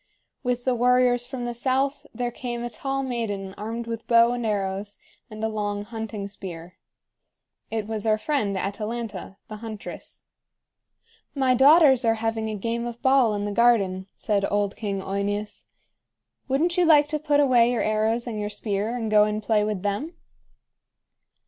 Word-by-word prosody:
With 245 Hz, -1 st, -2 dB
the 255 Hz, -, +2 dB
warriors 245 Hz, 0 st, +3 dB
from 255 Hz, -2 st, -5 dB
the 240 Hz, -, -3 dB
south 270 Hz, +4 st, -1 dB
there 245 Hz, -1 st, -3 dB
came 240 Hz, -1 st, -5 dB
a 240 Hz, -, -4 dB
tall 270 Hz, +4 st, -3 dB
maiden 210 Hz, -7 st, -3 dB
armed 225 Hz, +3 st, -5 dB
with 230 Hz, -1 st, -6 dB
bow 235 Hz, 0 st, +5 dB
and 245 Hz, -1 st, -3 dB
arrows 200 Hz, 0 st, -2 dB, 0.3 s
and 215 Hz, 0 st, -8 dB
a -, -, +2 dB
long 205 Hz, -2 st, -3 dB
hunting 220 Hz, -2 st, -5 dB
spear. 180 Hz, -3 st, -9 dB, 0.9 s
It 220 Hz, -1 st, -2 dB
was 220 Hz, 0 st, -3 dB
our 215 Hz, 0 st, +3 dB
friend 215 Hz, -7 st, -1 dB
Atalanta, 210 Hz, 0 st, -4 dB
the 215 Hz, -, -7 dB
huntress. 220 Hz, -1 st, -8 dB, 1.1 s
"My 265 Hz, -2 st, +3 dB
daughters 270 Hz, 0 st, +6 dB
are 225 Hz, -1 st, +3 dB
having 225 Hz, 0 st, -2 dB
a 215 Hz, -, -3 dB
game 230 Hz, +3 st, -2 dB
of 235 Hz, 0 st, -7 dB
ball 260 Hz, -5 st, +4 dB
in 205 Hz, 0 st, -2 dB
the 205 Hz, -, -2 dB
garden," 200 Hz, -5 st, +2 dB
said 205 Hz, -3 st, 0 dB
old 205 Hz, -1 st, 0 dB
King 200 Hz, -3 st, -3 dB
OEneus. 205 Hz, +2 st, -3 dB, 0.8 s
"Wouldn't 320 Hz, +7 st, +1 dB
you 355 Hz, -, +4 dB
like 300 Hz, -3 st, +6 dB
to 305 Hz, -1 st, -1 dB
put 295 Hz, -1 st, +2 dB
away 245 Hz, -4 st, +4 dB
your 240 Hz, -, 0 dB
arrows 220 Hz, +2 st, +1 dB
and 225 Hz, -3 st, -4 dB
your 210 Hz, 0 st, -2 dB
spear, 210 Hz, +2 st, -2 dB
and 225 Hz, -3 st, -3 dB
go 210 Hz, -1 st, +6 dB
and 215 Hz, 0 st, -2 dB
play 210 Hz, -1 st, +2 dB
with 210 Hz, -3 st, -2 dB
them?" 240 Hz, -, -2 dB
225 Hz, 170 wpm, -25 LUFS, 205-245 Hz, 1.1 s, daughters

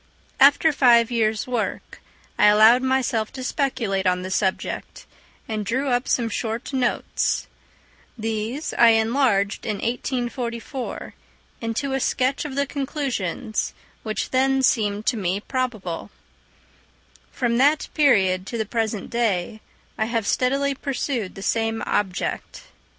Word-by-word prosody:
After 290 Hz, +3 st, +6 dB
five 240 Hz, -4 st, +5 dB
years' 220 Hz, -2 st, +1 dB
work 245 Hz, -3 st, -4 dB, 0.4 s
I -, -, +7 dB
allowed 220 Hz, +4 st, +7 dB
myself 255 Hz, -4 st, 0 dB
to 260 Hz, -, -6 dB
speculate 235 Hz, -9 st, -1 dB
on 180 Hz, 0 st, +1 dB
the 185 Hz, -, -5 dB
subject, 190 Hz, -1 st, -2 dB, 0.4 s
and 215 Hz, -2 st, -2 dB
drew 260 Hz, +7 st, -1 dB
up 245 Hz, 0 st, 0 dB
some 235 Hz, -2 st, +1 dB
short 230 Hz, +4 st, -4 dB
notes; 255 Hz, -2 st, 0 dB, 0.7 s
these 225 Hz, +6 st, -3 dB
I 235 Hz, -1 st, +8 dB
enlarged 220 Hz, -4 st, +1 dB
in 215 Hz, -, -2 dB
1844 240 Hz, +1 st, -4 dB, 0.5 s
into 235 Hz, +4 st, -2 dB
a 270 Hz, -, 0 dB
sketch 265 Hz, +2 st, 0 dB
of 280 Hz, -3 st, -5 dB
the 280 Hz, 0 st, +1 dB
conclusions, 265 Hz, -, -3 dB, 0.3 s
which 215 Hz, -1 st, -3 dB
then 265 Hz, +1 st, +2 dB
seemed 210 Hz, -3 st, +1 dB
to 245 Hz, -, +1 dB
me 190 Hz, -1 st, -1 dB
probable: 215 Hz, -8 st, -3 dB, 1.2 s
from 235 Hz, -2 st, 0 dB
that 290 Hz, +4 st, +3 dB
period 195 Hz, -11 st, +3 dB
to 235 Hz, -, -4 dB
the 220 Hz, -, -1 dB
present 220 Hz, -2 st, -2 dB
day 215 Hz, -3 st, -1 dB, 0.4 s
I 220 Hz, -, +2 dB
have 230 Hz, -2 st, -1 dB
steadily 275 Hz, +5 st, +1 dB
pursued 265 Hz, -6 st, -3 dB
the 195 Hz, -, -8 dB
same 225 Hz, +1 st, 0 dB
object. 195 Hz, -3 st, -2 dB
235 Hz, 130 wpm, -23 LUFS, 215-260 Hz, 1.2 s, I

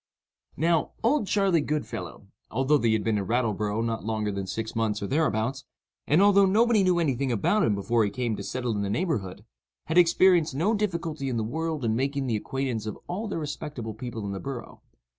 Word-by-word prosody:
Now, 165 Hz, +1 st, +1 dB
"Old 235 Hz, -1 st, +2 dB
Charley 195 Hz, -6 st, +2 dB
Goodfellow," 95 Hz, -, -4 dB, 0.2 s
although 135 Hz, +4 st, +2 dB
he 115 Hz, -3 st, +2 dB
had 110 Hz, -1 st, 0 dB
been 110 Hz, -2 st, +1 dB
in 95 Hz, -, -4 dB
Rattleborough 110 Hz, -2 st, 0 dB
not 115 Hz, -3 st, -2 dB
longer 110 Hz, -1 st, -1 dB
than 100 Hz, -1 st, -4 dB
six 110 Hz, +3 st, -4 dB
months 110 Hz, -2 st, 0 dB
or -, -, -1 dB
thereabouts, 135 Hz, -1 st, 0 dB, 0.4 s
and 160 Hz, +7 st, +4 dB
although 200 Hz, -1 st, +6 dB
nobody 220 Hz, +2 st, +4 dB
knew 185 Hz, -2 st, +3 dB
any 160 Hz, -6 st, +2 dB
thing 130 Hz, +1 st, -1 dB
about 120 Hz, -, +2 dB
him 105 Hz, -, +2 dB
before 115 Hz, +3 st, +1 dB
he 105 Hz, -, +1 dB
came 115 Hz, +1 st, -2 dB
to 100 Hz, -, -6 dB
settle 125 Hz, +3 st, -3 dB
in 105 Hz, -2 st, -1 dB
the 100 Hz, -, -2 dB
neighborhood, 105 Hz, -, -2 dB, 0.4 s
had 160 Hz, +3 st, +3 dB
experienced 170 Hz, -3 st, +4 dB
no 180 Hz, +10 st, +2 dB
difficulty 170 Hz, -9 st, -2 dB
in 120 Hz, -, -2 dB
the 110 Hz, -, 0 dB
world 155 Hz, +3 st, -3 dB
in 110 Hz, -1 st, +1 dB
making 135 Hz, +2 st, -1 dB
the 120 Hz, -4 st, 0 dB
acquaintance 120 Hz, -1 st, -3 dB
of 110 Hz, -, -5 dB
all 205 Hz, +6 st, -3 dB
the 200 Hz, -, -3 dB
respectable 145 Hz, -6 st, -5 dB
people 115 Hz, -1 st, -6 dB
in 100 Hz, -, -3 dB
the 95 Hz, -, -4 dB
borough. 135 Hz, 0 st, -7 dB
130 Hz, 205 wpm, -27 LUFS, 110-165 Hz, 0.4 s, although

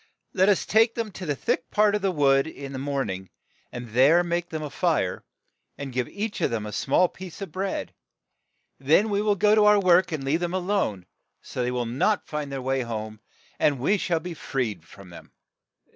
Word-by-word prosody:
"Let 190 Hz, +2 st, +4 dB
us 200 Hz, -, +2 dB
take 225 Hz, +2 st, +3 dB
them 230 Hz, -2 st, -2 dB
in -, -, -18 dB
to 180 Hz, -2 st, -7 dB
the 145 Hz, -, 0 dB
thick 165 Hz, -, -2 dB
part 210 Hz, 0 st, +3 dB
of 210 Hz, -, 0 dB
the 195 Hz, -, +1 dB
wood 140 Hz, -4 st, +3 dB
in 140 Hz, -3 st, -8 dB
the 130 Hz, -, -4 dB
morn 140 Hz, -5 st, -2 dB
ing, 95 Hz, 0 st, -7 dB, 0.4 s
and 120 Hz, -1 st, -7 dB
there 135 Hz, +10 st, +5 dB
make 175 Hz, 0 st, -2 dB
them 155 Hz, -1 st, -4 dB
a 150 Hz, -, -6 dB
fire, 155 Hz, -, 0 dB, 0.5 s
and 140 Hz, -2 st, -6 dB
give 125 Hz, -1 st, -1 dB
each 210 Hz, +1 st, -4 dB
of -, -, +2 dB
them 110 Hz, -2 st, -3 dB
a 105 Hz, -, -6 dB
small 140 Hz, -, +2 dB
piece 185 Hz, -1 st, -10 dB
of 195 Hz, -5 st, -6 dB
bread; 190 Hz, +3 st, -3 dB, 0.9 s
then 160 Hz, +11 st, +3 dB
we 200 Hz, 0 st, +1 dB
will 210 Hz, -1 st, +2 dB
go 210 Hz, +2 st, +3 dB
to 215 Hz, -1 st, +5 dB
our 210 Hz, 0 st, +6 dB
work 185 Hz, -1 st, +4 dB
and 155 Hz, -4 st, -3 dB
leave 140 Hz, +5 st, +1 dB
them 175 Hz, +1 st, -2 dB
a -, -, +2 dB
lone, 180 Hz, -, -1 dB, 0.4 s
so -, -, -5 dB
they 125 Hz, -, 0 dB
will 125 Hz, -1 st, -2 dB
not 140 Hz, -, 0 dB
find 150 Hz, -2 st, -5 dB
the 135 Hz, -2 st, -4 dB
way 135 Hz, 0 st, 0 dB
home, 110 Hz, -2 st, -5 dB, 0.4 s
and 145 Hz, -2 st, +3 dB
we 195 Hz, +11 st, +1 dB
shall 170 Hz, -2 st, 0 dB
be 175 Hz, +2 st, -6 dB
freed 120 Hz, -, -3 dB
from 95 Hz, +1 st, -14 dB
them." 85 Hz, -, -13 dB
155 Hz, 220 wpm, -25 LUFS, 130-190 Hz, 0.9 s, our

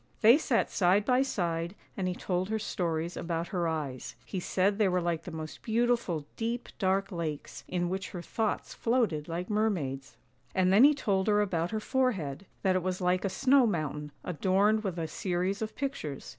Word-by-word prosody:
They 235 Hz, +7 st, +8 dB
sat 255 Hz, -7 st, +1 dB
side 195 Hz, +2 st, +3 dB
by 250 Hz, +2 st, +4 dB
side 170 Hz, -8 st, -1 dB, 0.2 s
and 190 Hz, -2 st, -1 dB
he 180 Hz, -, -1 dB
told 185 Hz, +1 st, -2 dB
her 220 Hz, -, 0 dB
stories 170 Hz, -5 st, -2 dB
about 170 Hz, 0 st, -3 dB
her 175 Hz, -3 st, 0 dB
eyes; 145 Hz, -6 st, -4 dB
he 190 Hz, -, -4 dB
said 195 Hz, +3 st, +1 dB
they 210 Hz, -, +4 dB
were 180 Hz, -1 st, +2 dB
like 170 Hz, -2 st, -2 dB
the -, -, -5 dB
most 160 Hz, -1 st, -7 dB
beautiful 230 Hz, -9 st, +1 dB
deep, 235 Hz, +2 st, -3 dB
dark 195 Hz, 0 st, +1 dB
lakes, 160 Hz, -5 st, -4 dB
in 175 Hz, -1 st, -1 dB
which 190 Hz, +2 st, -3 dB
her 175 Hz, -2 st, -7 dB
thoughts 220 Hz, +2 st, -2 dB
floated 225 Hz, -11 st, 0 dB
like 175 Hz, +2 st, -3 dB
mermaids; 165 Hz, -, -1 dB, 0.4 s
and 185 Hz, 0 st, +3 dB
then 220 Hz, +7 st, +8 dB
he 295 Hz, 0 st, +6 dB
told 195 Hz, -7 st, 0 dB
her 210 Hz, -1 st, +4 dB
about 175 Hz, -5 st, 0 dB
her 220 Hz, -, -2 dB
forehead, 200 Hz, -, -1 dB, 0.2 s
that 190 Hz, -2 st, +3 dB
it 185 Hz, -, +2 dB
was 185 Hz, 0 st, -2 dB
like 180 Hz, 0 st, +1 dB
a 195 Hz, -, +1 dB
snow 265 Hz, +4 st, +4 dB
mountain, 150 Hz, -5 st, -2 dB
adorned 195 Hz, +5 st, +2 dB
with 190 Hz, -4 st, -3 dB
a 165 Hz, -1 st, -2 dB
series 185 Hz, +4 st, -1 dB
of 220 Hz, 0 st, -4 dB
pictures. 270 Hz, -, -4 dB
185 Hz, 190 wpm, -30 LUFS, 170-215 Hz, 0.4 s, They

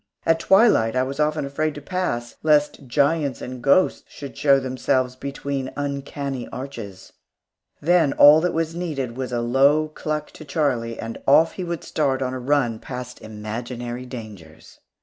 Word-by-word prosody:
At 165 Hz, 0 st, +3 dB
twilight 190 Hz, -, +4 dB
I 130 Hz, -, +2 dB
was 135 Hz, +2 st, -5 dB
often 150 Hz, -1 st, +1 dB
afraid 150 Hz, +2 st, -2 dB
to -, -, -6 dB
pass, 145 Hz, -8 st, -3 dB
lest 150 Hz, -3 st, +2 dB
giants 145 Hz, +1 st, +1 dB
and 125 Hz, 0 st, -7 dB
ghosts 140 Hz, +8 st, +3 dB
should 140 Hz, -2 st, -10 dB
show 140 Hz, -2 st, +4 dB
themselves 130 Hz, -1 st, -1 dB
between 135 Hz, 0 st, -4 dB
uncanny 140 Hz, -2 st, -4 dB
arches. 115 Hz, -8 st, -8 dB, 0.7 s
Then 170 Hz, -2 st, +3 dB
all 150 Hz, +2 st, +8 dB
that 180 Hz, +1 st, +1 dB
was 165 Hz, 0 st, -1 dB
needed 145 Hz, -9 st, -4 dB
was 130 Hz, 0 st, -4 dB
a 120 Hz, -1 st, -1 dB
low 140 Hz, +6 st, +3 dB
cluck 155 Hz, 0 st, -4 dB
to -, -, -12 dB
Charlie, 135 Hz, -6 st, -1 dB
and 115 Hz, 0 st, -6 dB
off 160 Hz, +4 st, +6 dB
he 185 Hz, -, -6 dB
would 170 Hz, -2 st, -4 dB
start 135 Hz, -4 st, 0 dB
on 130 Hz, 0 st, -2 dB
a 130 Hz, -, -4 dB
run 125 Hz, -4 st, +1 dB
past 125 Hz, -1 st, -8 dB
imaginary 120 Hz, +3 st, -6 dB
dangers. 105 Hz, -11 st, -11 dB
135 Hz, 160 wpm, -23 LUFS, 125-150 Hz, 0.7 s, all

